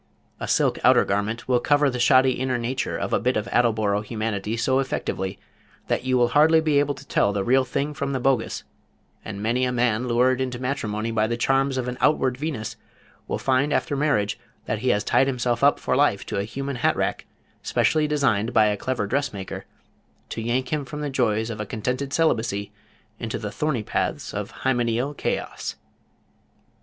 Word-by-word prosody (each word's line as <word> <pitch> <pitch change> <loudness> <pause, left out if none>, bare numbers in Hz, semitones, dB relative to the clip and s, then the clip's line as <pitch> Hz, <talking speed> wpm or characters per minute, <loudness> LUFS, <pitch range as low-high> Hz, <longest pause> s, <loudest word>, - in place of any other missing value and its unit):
A - - -4
silk - - +2
outer - - +6
garment 105 +4 -2
will 125 -1 +3
cover 145 +3 +3
the 125 -2 -2
shoddy 130 +1 +5
inner 130 0 -1
nature 125 +2 -2
of - - -3
a - - +3
bit 125 +4 +1
of 105 - -2
attleboro 110 -4 +2
humanity 110 -1 -3
so 130 +3 +2
effectively 95 -7 -2 0.5
that - - 0
you 130 0 +1
will 120 -1 +3
hardly 160 +2 +5
be 155 -3 +2
able 145 0 0
to - - -13
tell 100 - +2
the 100 -1 -1
real 130 +5 +3
thing 140 +3 -2
from 140 -1 -3
the 135 - -1
bogus, 125 -2 0 0.6
and 100 -1 -6
many 120 +3 +1
a 125 - +1
man 120 -1 +1
lured 125 +2 +2
into 125 -2 -2
matrimony 115 -4 -2
by 110 -1 +1
the 120 +1 -2
charms 135 +2 +1
of 125 -1 -2
an 125 0 -4
outward 135 -4 +3
Venus, 135 -5 -4 0.5
will - - -1
find 135 +2 +1
after 145 - 0
marriage 105 -9 +1 0.3
that 110 - -2
he 130 +3 0
has 105 -4 +2
tied 135 - +3
himself 125 -2 -1
up 145 - +5
for - - 0
life 130 -8 +2
to - - -3
a 100 - -1
human 135 +4 -4
hat - - +2
rack, - - -2 0.3
specially 155 -1 +1
designed 125 -7 +1
by 110 -1 +6
a 105 -1 +1
clever 125 -1 -2
dressmaker, 105 -5 -3 0.6
to 115 - -4
yank 125 +5 -1
him 150 -2 0
from 150 +3 -7
the 145 -1 -3
joys 110 -3 0
of 105 - -5
a - - -3
contented 125 +6 -3
celibacy 110 -10 0 0.5
into 115 -1 -3
the 105 - -5
thorny 135 -1 -1
paths - - -2
of - - -4
hymeneal 125 +1 +1
chaos. - - -3
125 Hz, 190 wpm, -24 LUFS, 110-135 Hz, 0.6 s, outer